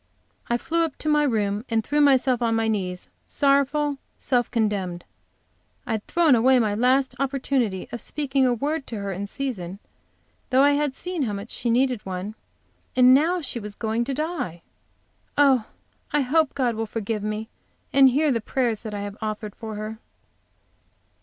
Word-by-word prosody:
I 235 - +2
flew 335 +6 0
up 320 -4 -2
to - - -6
my 300 -1 +4
room 210 -6 0
and 225 -1 +1
threw 295 +5 +1
myself 260 -3 +4
on 230 -1 +2
my 225 0 +1
knees, 185 -4 -2 0.2
sorrowful, 280 +1 +2 0.2
self 245 -3 0
condemned. 200 -6 -1 0.8
I 245 - -4
had 220 -2 -2
thrown 335 -4 +4
away 255 +2 +5
my 220 -4 +2
last 255 +5 +2
opportunity 260 -7 -1
of 240 - -5
speaking 275 -2 0
a - - +3
word 285 +5 -2
to 230 - -5
her 200 -1 -4
in 195 +2 -4
season, 200 -8 -4 0.7
though 260 +1 +5
I 285 - +6
had 290 -2 0
seen 360 0 -4
how 225 -6 -1
much 200 +3 -6
she 240 - -2
needed 250 -1 +2
one, 190 +2 -5 0.6
and 255 0 +7
now 335 +6 +3
she 250 -5 -2
was 210 -1 -8
going 225 +1 -1
to 270 +1 -3
die! 280 - -3 0.7
Oh, 270 -6 +4 0.5
I 295 - +2
hope 290 +3 +2
God 255 -4 +1
will 225 0 -3
forgive 215 0 -3
me, 215 +1 -3 0.5
and 270 -1 +7
hear 290 +3 +2
the 230 -3 0
prayers 235 -2 -1
I 205 -1 -4
have 205 0 -6
offered 215 -1 -4
her! 220 0 -5
245 Hz, 170 wpm, -24 LUFS, 215-275 Hz, 0.8 s, and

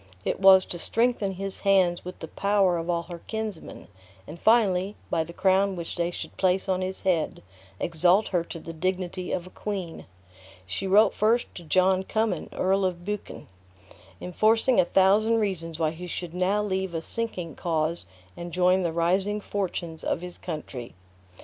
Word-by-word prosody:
It - - -1
was 190 -1 +7
to 175 - -5
strengthen 225 -1 +1
his 195 +1 -3
hands 185 -3 +3
with 180 +1 -8
the 160 - -7
power 195 -1 +1
of 165 +1 -5
all 170 -1 0
her 170 0 -9
kinsmen; 220 -6 -6 0.4
and 165 +9 -10
finally, 205 -3 +3 0.2
by 160 - +1
the 165 - -10
crown 190 +2 +2
which 170 -2 -6
they 170 -1 0
should 175 - -7
place 190 0 +1
on 185 -1 0
his 185 +1 -4
head, 170 - 0 0.4
exalt 175 +5 +3
her 175 -3 +1
to 170 - -7
the 165 +1 -8
dignity 185 +1 -3
of 180 - -2
a 185 - -12
queen. 190 -5 -5 0.6
She 95 - -3
wrote 210 +3 +5
first 225 +3 +1
to 175 - -9
John 185 +4 +3
Cummin, 215 -4 -1
Earl 195 +1 +1
of 175 -2 -2
Buchan, 210 0 -5 0.7
enforcing 220 +7 +2
a - - +5
thousand 200 +5 +4
reasons 170 -7 -2
why 160 -2 +1
he 175 +2 -8
should 175 -1 -5
now 190 +3 +1
leave 190 -3 -2
a 165 - -1
sinking 185 -9 -3
cause 165 - -1 0.3
and 175 0 -7
join 180 +2 +3
the 170 -2 0
rising 190 +5 +1
fortunes 180 -5 -4
of 170 - -1
his 180 -1 -8
country. 145 -7 -7
185 Hz, 175 wpm, -26 LUFS, 170-195 Hz, 0.7 s, was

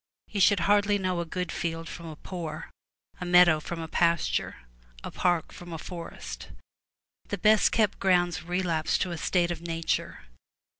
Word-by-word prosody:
You 205 - -3
shall 200 +2 +6
hardly 205 +2 +3
know 185 -2 -1
a 170 - -2
good 180 0 -3
field 165 -1 -3
from 170 0 -8
a 155 - -7
poor, 160 -2 -7 0.5
a - - -4
meadow 175 -3 +6
from 165 +2 -6
a 165 - -5
pasture, 170 0 +1 0.5
a - - -6
park 175 -3 0
from 175 -1 -11
a 165 - -4
forest. 170 +1 -8 0.8
The 200 - -3
best 215 +2 +4
kept 215 -3 +1
grounds 175 -2 +2
relapse 175 -2 0
to 185 - -2
a 170 - -4
state 175 -2 +1
of 170 -2 -5
nature. 165 -1 -2
175 Hz, 165 wpm, -28 LUFS, 165-185 Hz, 0.8 s, shall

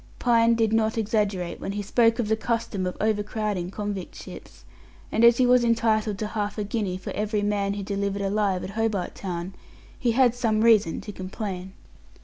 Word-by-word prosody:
Pine 230 -1 +3
did 225 -1 +1
not 220 0 +1
exaggerate 205 -5 -1
when 195 - -4
he 205 0 -3
spoke 230 +2 +3
of 240 -4 -1
the 220 - +2
custom 220 -4 -2
of 180 - -5
overcrowding 210 -3 -1
convict 200 -2 -5
ships; - - -11 0.5
and 225 - +1
as 235 0 +7
he 255 - +4
was 250 0 +5
entitled 220 -3 +1
to 215 - -3
half 210 -1 -3
a 210 - -1
guinea 205 -3 -2
for 185 - -7
every 210 0 -1
man 200 -1 0
he 200 0 -4
delivered 200 0 -2
alive 195 -2 0
at 190 - -6
Hobart 215 -3 -1
Town, 180 -1 -5 0.5
he 240 -2 +1
had 250 -1 +4
some 225 -3 0
reason 220 -7 +4
to 210 - -7
complain. 190 -1 -6
210 Hz, 185 wpm, -25 LUFS, 195-225 Hz, 0.5 s, as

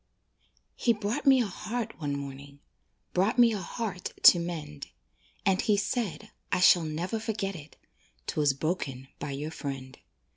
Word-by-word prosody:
He 235 - +3
brought 220 +7 -3
me 265 -2 +7
a - - -2
heart 215 +1 -4
one 145 -1 -1
morning, 140 0 -8 0.5
Brought 195 +7 +2
me 240 -2 +6
a 210 - -2
heart 190 0 -4
to 175 - +9
mend; 165 - -5 0.6
And 190 -1 +3
he 210 -2 +2
said 210 -1 -2 0.2
(I 180 - +2
shall 175 -2 +6
never 170 +8 -2
forget 210 -3 -3
it) 150 -2 -11 0.5
"'Twas 145 - +2
broken 135 -3 -3
by 145 - -4
your 145 +3 -4
friend." 135 -3 -6
180 Hz, 150 wpm, -29 LUFS, 145-215 Hz, 0.6 s, to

